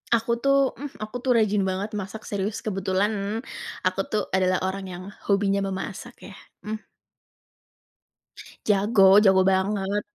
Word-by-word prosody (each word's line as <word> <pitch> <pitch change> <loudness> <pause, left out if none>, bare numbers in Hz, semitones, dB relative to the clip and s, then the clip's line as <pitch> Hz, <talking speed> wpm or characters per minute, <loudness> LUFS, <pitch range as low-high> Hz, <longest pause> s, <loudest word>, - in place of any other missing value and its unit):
Aku 235 +1 0
tuh, 275 +1 +3
mmm, 285 0 -7
aku 215 +3 -5
tuh 250 0 +1
rajin 210 -3 +2
banget 190 +3 -2
masak 210 +1 -6
serius, 205 +1 -3
kebetulan 200 +2 -1 0.4
aku 185 +1 0
tuh 215 - 0
adalah 185 -1 +1
orang 190 +1 -3
yang 180 0 -7 0.2
hobinya 200 0 +2
memasak 195 +4 -5 0.2
ya, - - -12 0.3
mmm. 215 +1 -6 1.8
Jago 205 +1 +4 0.2
jago 190 -1 +6
banget. 195 +1 0
200 Hz, 130 wpm, -25 LUFS, 190-220 Hz, 1.8 s, jago